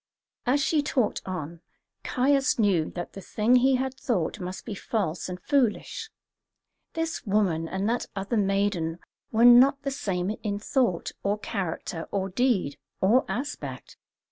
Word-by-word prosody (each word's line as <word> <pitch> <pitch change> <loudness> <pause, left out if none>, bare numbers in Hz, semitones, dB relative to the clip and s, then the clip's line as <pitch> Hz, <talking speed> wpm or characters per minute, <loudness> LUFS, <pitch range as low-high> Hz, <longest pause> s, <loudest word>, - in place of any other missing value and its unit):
As 280 +3 +3
she 300 +2 +2
talked 260 -6 0
on, 170 -2 -5 0.4
Caius 275 +2 +2
knew 195 -8 +2
that 175 -1 -5
the 195 - -8
thing 220 +6 +3
he 260 +2 +4
had 260 0 -1
thought 220 -8 -1
must 185 0 -6
be - - -4
false 185 -5 -2
and 180 0 -5
foolish. 275 - 0 0.8
This 325 -1 -2
woman 190 -6 +1
and 190 +4 -2
that 240 +2 0
other 200 +4 -2
maiden 195 -5 +1 0.3
were 230 +1 +4
not 260 +3 +7
the 275 - -1
same 195 -6 -2
in 205 -2 -2
thought, 210 -4 0
or 200 +1 0
character, 180 -5 -4
or 195 -1 -1
deed, 195 - +1 0.2
or 225 +7 +4
aspect. 255 +10 -5
210 Hz, 145 wpm, -27 LUFS, 185-255 Hz, 0.8 s, not